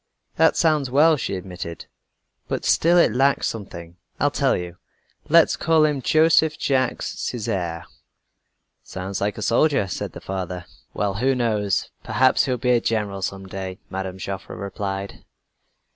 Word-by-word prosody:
"That - - +4
sounds 155 -5 +2
well," 155 +5 +5
she 130 - -3
admitted, 90 -2 -7 0.6
"but - - -3
still 170 +2 +4
it 170 - +4
lacks 135 +3 +2
something. 85 -5 -7 0.2
I'll - - +2
tell - - +1
you. 90 -1 -7 0.5
Let's 165 +1 +5
call 160 -1 +3
him 145 -3 0
Joseph 160 +2 +3
Jacques 130 -2 0
Césaire." 95 -9 -3 1.0
"Sounds 95 +1 -6
like 100 0 -1
a - - -4
soldier," 135 -3 +2
said 90 - -5
the - - -8
father. 90 -2 -5 0.3
"Well, 100 -1 0
who 130 +4 +2
knows? 105 -5 0
Perhaps 130 0 +3
he - - -4
will 125 - 0
be 125 +1 +1
a 120 -1 +3
general 105 -4 -2
some 95 +1 -4
day," 95 -1 -6
Mme. 95 -1 -4
Joffre 95 0 -6
replied. 100 0 -5
105 Hz, 150 wpm, -23 LUFS, 95-135 Hz, 1.0 s, well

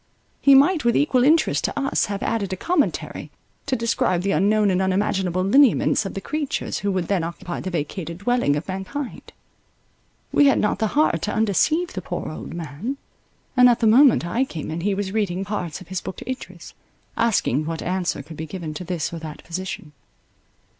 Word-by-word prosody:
He 275 -1 +7
might 300 +4 +4
with 235 -1 +3
equal 260 -4 +3
interest 315 +4 +3
to - - -2
us, 275 0 +1
have 200 -1 -4
added 215 -4 -1
a - - -1
commentary, 320 - -1 0.4
to 265 - +1
describe 230 -6 0
the 200 - 0
unknown 205 +5 +3
and 185 0 +1
unimaginable 190 -1 0
lineaments 220 -1 +4
of - - -8
the 195 - -4
creatures, 300 +5 -3
who 200 0 -1
would 185 -3 -1
then 190 -4 +1
occupy 170 +1 -5
the 185 - -4
vacated 170 0 -4
dwelling 225 -7 +1
of 150 - -4
mankind. 195 +9 -6 1.0
We 290 - +5
had 275 - +4
not 210 - 0
the 220 - +1
heart 235 - +3
to 210 - -2
undeceive 305 - +1
the - - -4
poor - - -5
old - - -8
man; 170 - -5 0.6
and 250 -1 +7
at 240 0 +2
the 230 - +1
moment 240 - +6
I 230 +9 0
came 165 - -6
in, 165 +2 -3
he 200 +2 0
was 195 -1 -3
reading 195 -3 -1
parts 185 -4 -4
of 185 - -13
his 185 -1 -3
book - - -6
to - - -10
Idris, 260 0 -7 0.4
asking 210 - +1
what 165 -1 -4
answer 180 -5 -2
could 155 +2 -11
be 160 - -5
given 160 -1 -6
to 165 - -6
this 170 -3 -3
or 165 - -5
that 155 -2 -9
position. 170 -3 -6
195 Hz, 195 wpm, -23 LUFS, 175-245 Hz, 1.0 s, He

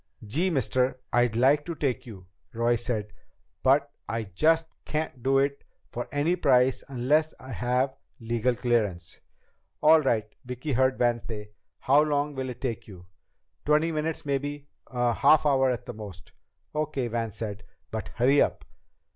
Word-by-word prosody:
"Gee, 155 - 0
mister, 130 -3 0
I'd 120 -2 +3
like 135 +5 +4
to 170 - -3
take 135 -5 -2
you," 95 -6 -10 0.3
Roy 115 +1 +2
said, 110 -3 -3 0.5
"but 140 +2 +3 0.2
I 115 +1 -1
just 155 - +2 0.2
can't 150 -4 -3
do 135 +2 +2
it 140 +1 0 0.3
for 120 - -4
any 150 +5 +1
price 130 -6 +3
unless 145 +5 +1
I 130 - -10
have 125 +3 0 0.2
legal 120 +1 0
clearance." 110 -8 -1 0.6
"All 160 +1 +6
right," 115 -6 +1 0.2
Vicki 125 +3 -5
heard 130 +1 +2
Van 120 -1 +2
say, 105 -2 -8 0.3
"how 140 +3 +5
long 150 -1 0
will 130 -1 -4
it 125 0 -8
take 120 -4 -3
you?" 90 -4 -12 0.6
"Twenty 150 +2 +2
minutes 155 0 -3
maybe. 145 +1 -3 0.2
A 120 -2 0
half 155 +6 +4
hour 135 -2 +3
at 125 -3 -2
the 120 - -6
most." 100 -4 -10 0.4
"Okay," 150 -4 -1
Van 115 -1 -2
said. 105 -1 -6 0.3
"But 110 -3 -4
hurry 135 +5 +4
it - - +7
up." - - -8
130 Hz, 160 wpm, -27 LUFS, 115-145 Hz, 0.6 s, it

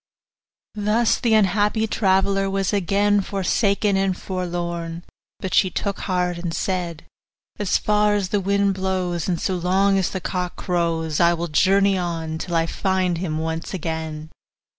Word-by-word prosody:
Thus 215 +2 +1
the 230 -2 +2
unhappy 210 +2 +2
traveller 195 -1 +1
was 195 0 -1
again 205 +1 +2
forsaken 200 +1 +1
and 195 -1 0
forlorn; 175 -2 -4 0.4
but 190 - -4
she 185 - +4
took 200 +1 -3
heart 180 -2 -1
and 170 -2 -3
said, 175 -3 -3 0.5
'As 205 -3 +2
far 210 0 +2
as 195 -3 -1
the 205 - +1
wind 200 +1 +2
blows, 185 -3 -2
and 175 -2 0
so 190 - -1
long 190 +3 +2
as 185 - 0
the 190 - -4
cock 180 -1 -3
crows, 165 -4 -1
I 170 0 +4
will 170 +1 -3
journey 195 +4 +3
on, 165 -2 -3
till 175 0 -3
I 165 0 +3
find 185 -1 0
him 160 -4 -2
once 160 +3 -3
again. 160 -2 -5
185 Hz, 155 wpm, -22 LUFS, 170-200 Hz, 0.5 s, she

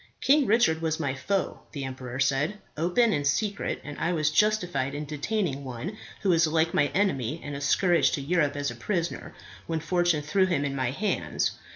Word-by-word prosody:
"King 280 0 +4
Richard 200 -8 +3
was 160 -1 -1
my 140 -4 -1
foe," 185 +9 -2
the 140 -3 -4
emperor 130 -1 -6
said, 140 +8 +1 0.2
"open 180 +9 +2
and 145 -1 0
secret, 205 +8 -1
and 145 0 -8
I 170 +2 0
was 155 -2 +1
justified 180 -7 +1
in 150 +1 -4
detaining 150 0 -2
one 130 - -5 0.3
who 195 - +3
is 165 -1 +4
alike 160 +1 +1
my 145 - +3
enemy 155 - 0
and 145 -1 -5
a 140 - -5
scourge 165 -1 +3
to 140 - -1
Europe 150 -1 +1
as 145 -2 -2
a - - -8
prisoner, 170 - -3 0.3
when 165 -1 -1
fortune 170 -1 +1
threw 185 +6 +2
him 155 -6 0
in 140 -1 -2
my 130 -2 0
hands. 200 - -1
155 Hz, 195 wpm, -27 LUFS, 140-180 Hz, 0.3 s, King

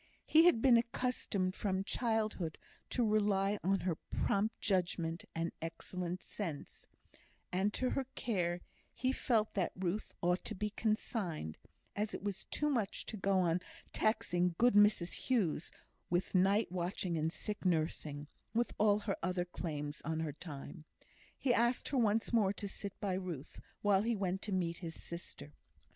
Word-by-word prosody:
He 320 +2 +6
had 290 -11 +5
been 250 -3 +8
accustomed 230 -5 0
from 190 -1 -1
childhood 215 -8 0 0.3
to 240 -3 +2
rely 205 -1 +2
on 195 +2 +2
her 175 -3 0
prompt 210 +3 0
judgment 175 -4 0
and 165 +1 -1
excellent 175 +2 -4
sense; 165 -9 -6 0.6
and 190 +3 +2
to 255 - 0
her 270 - 0
care 175 -6 0 0.3
he 255 0 +1
felt 225 -5 +1
that 185 -4 0
Ruth 185 +3 -2
ought 175 +1 +1
to - - -4
be 210 +2 -2
consigned, 205 - -1 0.4
as 210 +1 -1
it - - -7
was 200 -2 -3
too 295 - -1
much 230 -9 0
to - - -5
go 195 -2 +2
on 175 0 +2 0.3
taxing 180 -5 +1
good 245 +1 +5
Mrs 205 -4 +5 0.2
Hughes 190 - +1 0.4
with 175 +1 0
night 195 +2 +4
watching 180 0 -1
and 160 0 0
sick 210 +4 -4
nursing, 155 -4 0 0.3
with 235 +1 +1
all 210 -1 +4
her 205 -2 -1
other 180 -1 0
claims 150 -4 -4
on 160 +1 -1
her 155 -3 -2
time. 150 -1 -8 0.5
He 250 - +2
asked 240 +1 +2
her 275 - 0
once 225 +1 +2
more 205 -4 +4
to 205 0 -4
sit 200 0 -7
by 195 -2 0
Ruth, 180 -7 -5 0.2
while 200 -2 +5
he 230 +2 +1
went 190 -1 -1
to 210 - -4
meet 175 -3 0
his 165 -3 -6
sister. 150 -4 -7
190 Hz, 160 wpm, -35 LUFS, 175-215 Hz, 0.6 s, been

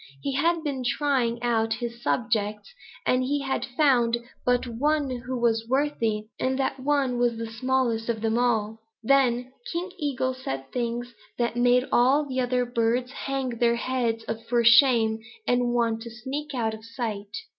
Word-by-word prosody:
He 275 - -1
had 330 +4 +1
been 280 -4 -2
but 250 - -1
trying 245 -5 0
out 225 -2 +1
his 235 0 -6
subjects, 215 - -1 0.3
and 255 - +3
he 285 +2 0
had 270 -1 -2
found 245 -4 +2 0.3
but 245 0 +2
one 285 +4 0
who 250 +1 -4
was 225 -1 +1
worthy, 255 -6 0 0.2
and 260 0 0
that 270 0 -1
one 265 -3 +1
was 240 -1 +1
the 230 - -3
smallest 235 0 -1
of 225 -2 -1
them 225 0 +1
all. 225 -3 +1 0.2
Then 250 -1 +2 0.2
King 360 +2 -3
Eagle 260 -4 -1
said 135 - -6
things 240 0 -3 0.2
that 235 -1 0
made 245 +1 +4
all 265 +5 +4
the 260 -2 -3
other 250 0 +1
birds 240 +1 0
hang 270 -1 -3
their 235 -1 +3
heads 235 -2 -1 0.2
for 240 -1 +3
shame 230 -2 +5 0.3
and 245 0 +2
want 230 -2 +1
to 235 - -7
sneak 270 +5 -5
out 225 -3 0
of 220 0 -9
sight. 220 -4 -5
245 Hz, 165 wpm, -26 LUFS, 230-265 Hz, 0.3 s, shame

